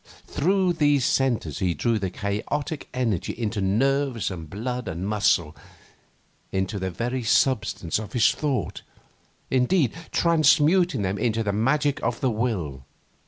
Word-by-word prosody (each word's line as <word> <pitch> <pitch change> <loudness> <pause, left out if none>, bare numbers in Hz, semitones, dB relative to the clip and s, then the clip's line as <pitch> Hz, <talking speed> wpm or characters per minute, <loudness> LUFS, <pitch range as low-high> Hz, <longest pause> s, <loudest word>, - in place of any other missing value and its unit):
Through 185 +3 +1
these 145 -5 +2
centres 120 - 0
he 90 -3 0
drew 115 +8 0
the 95 -2 -2
chaotic 120 - -3
energy 115 -8 -1
into 110 -3 -2
nerves 120 +2 +1
and 80 -4 -7
blood 125 +6 -4
and 85 +4 -4
muscle, 85 -7 +1 1.0
into 95 +2 -2
the 95 0 -2
very 120 +8 -3
substance 105 -7 +1
of 110 -3 -8
his 120 - +4
thought, 145 -4 -2 0.7
indeed, 130 - +2 0.2
transmuting 165 - +3
them 95 +1 -2
into 115 -2 0
the 100 -2 -1
magic 140 +7 +1
of 120 0 -1
the 130 - +1
will. 95 - -2
115 Hz, 135 wpm, -25 LUFS, 100-135 Hz, 1.0 s, his